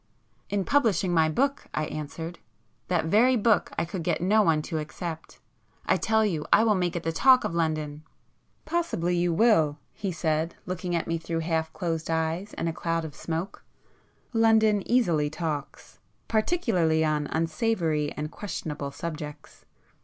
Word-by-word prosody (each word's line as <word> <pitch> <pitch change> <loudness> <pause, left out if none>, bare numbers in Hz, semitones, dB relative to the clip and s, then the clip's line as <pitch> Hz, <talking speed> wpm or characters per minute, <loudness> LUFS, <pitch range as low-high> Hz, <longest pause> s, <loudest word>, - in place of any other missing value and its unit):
"In 200 -2 -1
publishing 210 - +2
my 160 -2 +4
book," 275 - 0
I 155 - 0
answered. 160 +3 -6 0.5
"That 175 -3 +1
very 230 +9 +4
book 220 -3 +2
I - - +1
could 175 +1 -5
get 165 0 0
no 205 +5 +4
one 160 -6 +2
to 160 - -3
accept,—I 160 +1 -5
tell 220 0 +2
you, 165 -7 -1
I 220 - +6
will 220 -2 +4
make 180 -2 0
it 170 - -3
the 165 - 0
talk 255 +9 +5
of 210 -5 -2
London!" 155 -3 -1 0.6
"Possibly 310 - 0
you 175 0 +1
will"—he 180 -1 +1
said, 160 -1 -1
looking 180 -1 -3
at 170 - -1
me 165 0 -2
through 165 0 -3
half 160 -1 -1
closed 165 -3 -3
eyes 165 +5 -1
and - - -2
a 165 - -1
cloud 165 -1 -2
of 155 - -7
smoke,—"London 215 +6 -1
easily 170 -12 +2
talks. 155 -3 -5 0.3
Particularly 215 - +1
on 150 -1 0
unsavoury 160 -2 0
and 150 +1 -5
questionable 150 -8 -5
subjects. 150 0 -7
170 Hz, 150 wpm, -27 LUFS, 160-205 Hz, 0.6 s, I